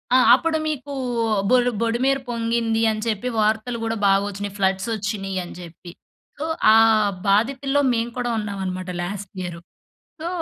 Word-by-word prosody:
ఆ! - - +8 0.2
అప్పుడు 325 -1 0
మీకూ 285 -2 -4 0.6
బొల్ 245 -1 +4
బొడిమేర 255 +4 +1
పొంగింది 230 -1 0
అని 215 0 -4
చెప్పి 220 +3 -1
వార్తలు 220 +3 0
గూడా 225 0 -1
బాగొచ్చినియి. 200 0 0
ఫ్లడ్సొచ్చినియని 195 -1 -2
జెప్పి. 175 0 -11 0.5
సో, 305 - -3 0.3
ఆ - - +7 0.5
బాధితుల్లో 270 +7 +2
మేము 230 +1 -1
కూడా 245 -1 -1
ఉన్నామనమాట 190 -3 -4
లాస్ట్ 195 +2 -5
ఇయరు. 170 -1 -6 0.6
సో, 335 - -3
220 Hz, 125 wpm, -22 LUFS, 195-245 Hz, 0.6 s, ఆ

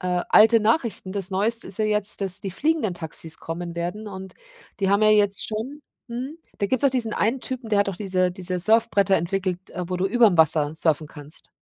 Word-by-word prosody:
äh, 180 -1 -1
alte 225 +1 +6
Nachrichten. 220 -4 0
Das 195 -1 -2
neueste 220 +5 -1
ist 195 - -7
ja 215 - +1
jetzt, 210 -1 0
dass 190 -2 0
die 195 - -5
fliegenden 290 - 0
Taxis 160 -1 -5
kommen 170 +1 -6
werden 180 +6 -4
und 190 -1 -9 0.5
die 195 - +1
haben 200 +2 +3
ja 215 - +6
jetzt 205 -2 +2
schon 250 +7 -5 0.3
mhm, 255 +7 -6 0.2
da 200 - 0
gibt's 260 +3 -1
doch 280 - +4
diesen 235 -4 -1
einen 230 +5 +1
Typen, 255 -3 -5
der 210 -2 +2
hat 200 - +2
doch 190 - -4
diese 185 -3 0
diese 180 -1 -4
Surfbretter 205 0 +3
entwickelt, 185 +1 -3
äh, 180 0 -5
wo 185 - -2
du 185 +2 0
überm 220 -3 +4
Wasser 155 -1 +3
surfen 160 -2 +1
kannst. 150 0 -10
200 Hz, 210 wpm, -23 LUFS, 180-220 Hz, 0.5 s, alte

